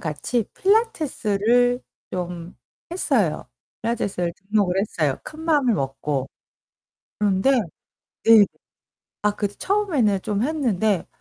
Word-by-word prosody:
같이 170 +9 -2
필라테스를 245 - +2 0.3
좀 175 -1 -5 0.4
했어요. 370 - 0 0.3
필라테스를 200 -7 -1
등록을 195 -2 0
했어요. 155 -9 -1
큰 310 - -9
마음을 290 -8 +3
먹고. 135 -2 -2 0.9
그런데 205 +4 +3 0.7
네. 225 -2 +8 0.8
아 210 - +3
그 205 - 0
처음에는 275 - +1
좀 210 +1 -1
했는데 220 - 0
210 Hz, 225 characters per minute, -23 LUFS, 185-255 Hz, 0.9 s, 네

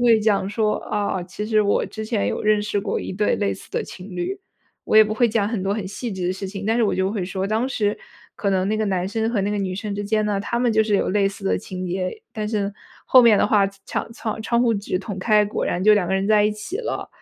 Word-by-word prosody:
会 235 -2 +5
讲 205 -3 +1
说： 215 0 +1
“啊， 200 -3 -1
其 190 +4 -6
实 215 -1 +3
我 200 - +1
之 220 - -6
前 100 - -1
有 105 - -2
认 215 0 +3
识 205 -1 -1
过 195 - -2
一 - - -5
对 210 +2 +1
类 205 -1 0
似 - - -14
的 - - -2
情 185 +2 -10
侣。” 380 - -3 0.4
我 - - +2
也 220 - +9
不 215 0 -2
会 240 +2 +3
讲 210 -2 +1
很 220 -4 -2
多 195 - 0
很 205 -2 -3
细 220 +3 -5
致 185 -2 -3
的 180 - +1
事 195 +1 -5
情， 195 +1 -6
但 225 +1 +2
是 240 - +2
我 215 - +2
就 190 +1 0
会 200 -4 -2
说： 190 +1 -3
“当 220 +4 +1
时 210 -5 0 0.4
可 200 - 0
能 190 0 +1
那 215 - +1
个 215 - 0
男 185 -2 -1
生 225 +2 -1
和 220 - 0
那 200 +1 0
个 210 - -1
女 190 -2 -2
生 205 +1 -4
之 205 0 -3
间 215 +1 +1
呢， 205 -1 0
他 235 +4 -2
们 245 -1 +2
就 220 0 +4
是 215 -1 0
有 - - 0
类 200 0 +2
似 195 +1 -5
的 - - +2
情 185 -2 -6
节， 185 - -3
但 215 -1 -2
是 210 -2 -1 0.4
后 255 - +7
面 225 -4 +6
的 - - +3
话 205 -3 +4 0.2
场 230 - -3
窗 220 -2 -4
窗 235 +1 +1
户 235 -2 +3
纸 200 -2 -2
捅 195 0 -6
开， 210 +2 +4
果 205 - -2
然 175 - -1
就 215 +2 +7
两 195 -4 +1
个 190 - -2
人 190 +1 0
在 210 -1 +4
一 210 - +3
起 215 - -6
了。” 485 - -4
210 Hz, 305 characters per minute, -22 LUFS, 195-220 Hz, 0.4 s, 也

